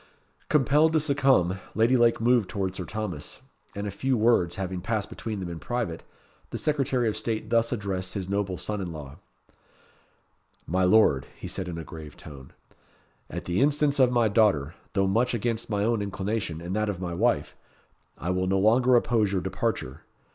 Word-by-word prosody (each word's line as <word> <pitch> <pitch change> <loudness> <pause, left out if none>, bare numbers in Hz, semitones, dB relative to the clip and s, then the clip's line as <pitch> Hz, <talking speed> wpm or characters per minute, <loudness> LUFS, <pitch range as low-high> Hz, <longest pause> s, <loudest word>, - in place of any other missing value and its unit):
Compelled 150 +3 +4
to 160 - +4
succumb, 135 - +2 0.2
Lady 115 +4 +4
Lake 120 -1 +4
moved 115 -4 +3
towards 95 -2 -3
Sir 90 - -4
Thomas, 105 -8 -5 0.3
and 100 +1 -4
a 105 - -3
few 130 +6 0
words 110 -6 +3
having 95 -1 -4
passed 110 0 -2
between 110 -3 -5
them 90 - -4
in 85 - -6
private, 120 -9 -3 0.5
the - - -4
Secretary 135 -5 +1
of 110 - 0
State 110 -2 -3
thus 115 0 +3
addressed 95 -5 -3
his 95 -2 -3
noble 100 -2 -1
son 105 -1 -3
in 90 -3 -4
law 75 -2 -9 1.5
"My 95 +2 0
Lord," 90 -9 +4
he - - -7
said 95 - -5
in 85 -2 -5
a 85 - -5
grave 80 -1 -10
tone, 70 -3 -11 0.8
"at - - -6
the 90 +5 0
instance 145 0 +2
of 130 -2 +5
my 120 -2 +3
daughter, 100 -9 +2 0.2
though 95 -1 +2
much 115 +6 +1
against 115 0 -2
my 100 -2 0
own 115 -1 +1
inclination, 100 -4 -3
and 90 +3 -4
that 110 0 0
of 95 -4 -3
my 90 -2 -4
wife, 115 +7 0 0.6
I 85 - -2
will 95 0 0
no 95 +1 +2
longer 120 +6 +4
oppose 115 -4 +2
your 95 -2 0
departure. 95 - -3
105 Hz, 185 wpm, -26 LUFS, 90-120 Hz, 1.5 s, of